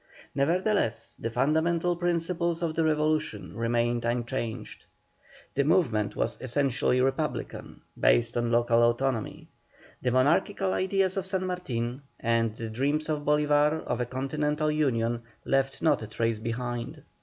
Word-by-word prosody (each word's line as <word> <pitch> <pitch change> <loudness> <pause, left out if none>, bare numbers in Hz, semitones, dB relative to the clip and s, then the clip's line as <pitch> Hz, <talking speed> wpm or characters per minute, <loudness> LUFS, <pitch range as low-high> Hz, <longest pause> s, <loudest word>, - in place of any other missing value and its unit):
Nevertheless 170 - 0
the 115 - -2
fundamental 160 +8 +1
principles 170 0 -1
of 165 -2 0
the 165 - +1
Revolution 155 -9 0
remained 120 +1 0
unchanged. 120 -1 -3 0.7
The 140 - +2
movement 120 - +2
was - - -1
essentially 130 0 +1
Republican, 135 +1 -2 0.2
based - - +3
on 120 -1 0
local 120 0 +3
autonomy. 120 0 0 0.5
The 125 - +1
monarchical 165 - +2
ideas 190 0 +1
of 190 -1 -2
San 185 -1 -1
Martin, 130 -9 -3 0.2
and 115 -1 +1
the 115 -1 -5
dreams 145 +7 0
of 155 -1 0
Bolívar 150 +1 +2
of 120 - -2
a 120 - -1
continental 150 +4 -1
union, 120 -6 0 0.2
left 135 0 0
not 160 - +3
a 110 - -6
trace 115 +1 -1
behind. 120 +5 -4
135 Hz, 130 wpm, -28 LUFS, 120-160 Hz, 0.7 s, based